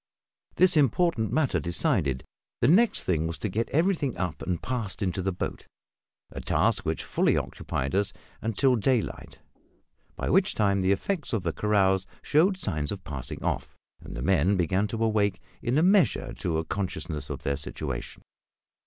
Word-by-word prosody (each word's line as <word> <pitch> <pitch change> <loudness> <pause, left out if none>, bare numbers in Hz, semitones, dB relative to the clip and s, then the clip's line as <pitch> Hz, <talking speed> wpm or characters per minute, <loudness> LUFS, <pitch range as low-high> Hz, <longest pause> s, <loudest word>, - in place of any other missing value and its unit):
This 185 -1 +5
important 145 -4 +2
matter 155 -4 +2
decided, 70 -5 0 0.4
the 120 - +3
next 210 - +4
thing 80 -3 0
was 85 - -4
to - - -3
get 110 +5 -1
everything 160 -4 +1
up 90 -4 -3
and 90 -3 -2
passed 115 -6 -3
into 95 -1 -1
the 95 +1 0
boat 90 - -5 0.6
a - - -6
task - - +1
which - - -1
fully - - +2
occupied 65 +1 -3
us 100 0 +1 0.3
until 125 +4 +2
daylight; 120 0 -1 0.8
by - - -3
which - - +3
time 100 -2 +2
the 95 +1 +2
effects 150 - -1
of 110 -5 0
the 85 -2 -1
carouse 95 -3 +2 0.2
showed 180 +6 +3
signs 75 - -2
of 100 -2 -6
passing 70 -4 -6
off, - - -2 0.3
and - - -8
the 60 - -4
men 95 +3 +3
began 95 +4 +1
to 115 +2 -2
awake 105 -3 +1 0.2
in 125 +3 0
a 155 - +4
measure 195 0 +3
to 85 -3 -2
a 80 - -2
consciousness 85 -5 -4
of - - -5
their 70 - 0
situation. 70 - -6
100 Hz, 170 wpm, -27 LUFS, 90-130 Hz, 0.8 s, This